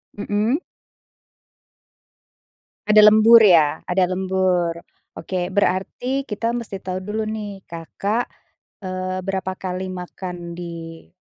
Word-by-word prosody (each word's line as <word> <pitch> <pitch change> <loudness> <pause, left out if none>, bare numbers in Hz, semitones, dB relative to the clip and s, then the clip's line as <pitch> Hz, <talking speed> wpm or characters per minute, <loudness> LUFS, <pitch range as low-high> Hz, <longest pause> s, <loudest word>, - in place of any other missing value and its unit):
Hmm. 210 +6 0 2.3
Ada 215 0 +7
lembur 225 +1 +7
ya? 160 -6 +4
Ada 180 0 +1
lembur. 185 -2 0 0.4
Oke 180 +1 -3
berarti 205 +8 0
kita 230 -1 -2
mesti 215 -5 -5
tau 185 0 -5
dulu 215 +2 -3
nih, 210 -2 -5
Kakak, 200 +8 -3 0.5
eee, 185 0 -3
berapa 190 0 -3
kali 185 0 -4
makan 180 -1 -7
di 165 -1 -8
185 Hz, 100 wpm, -21 LUFS, 180-210 Hz, 2.3 s, Ada